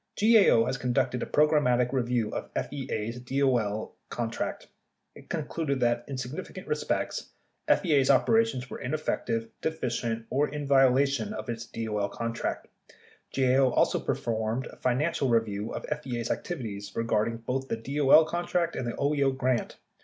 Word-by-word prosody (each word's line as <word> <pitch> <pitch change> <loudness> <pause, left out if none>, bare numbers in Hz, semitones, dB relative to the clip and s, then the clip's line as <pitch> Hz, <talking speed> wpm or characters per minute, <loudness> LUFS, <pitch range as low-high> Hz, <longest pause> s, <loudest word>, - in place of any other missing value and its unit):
54 220 +1 +6
GAO 115 -10 +5
has 135 - -2
conducted 125 0 0
a - - -3
programmatic 135 -5 +3
review 120 -4 0
of - - -4
FEA's 120 -4 -3
DOL 125 -5 0 0.2
con 115 -2 -3
tract. - - -4 0.5
It - - -15
concluded 155 -3 -2
that, 120 0 +1
in 135 - -5
significant 125 +3 -6
respects, 455 - -2 0.4
FEA's 145 -7 +3
operations 180 - +3
were - - -7
ineffective, 125 -5 -2
deficient, 120 -7 -2
or 145 +3 +2
in 150 0 -5
violation 140 +7 +3
of - - -6
its 115 0 -4
DOL 105 -3 -2
contract. 115 0 -3 0.7
GAO 130 0 +4
also - - +2
performed 110 +2 -2
a - - -10
financial 130 +2 0
review 110 -2 0
of - - -5 0.2
FEA's 120 -5 -3
activities 105 - -5
regarding 115 0 0
both 130 +3 -3
the 115 - -2
DOL 140 +6 +5
contract 175 0 -1
and 125 - -3
the 120 - -2
OEO 140 -2 +1
grant. 130 -2 0
125 Hz, 145 wpm, -28 LUFS, 115-140 Hz, 0.7 s, 54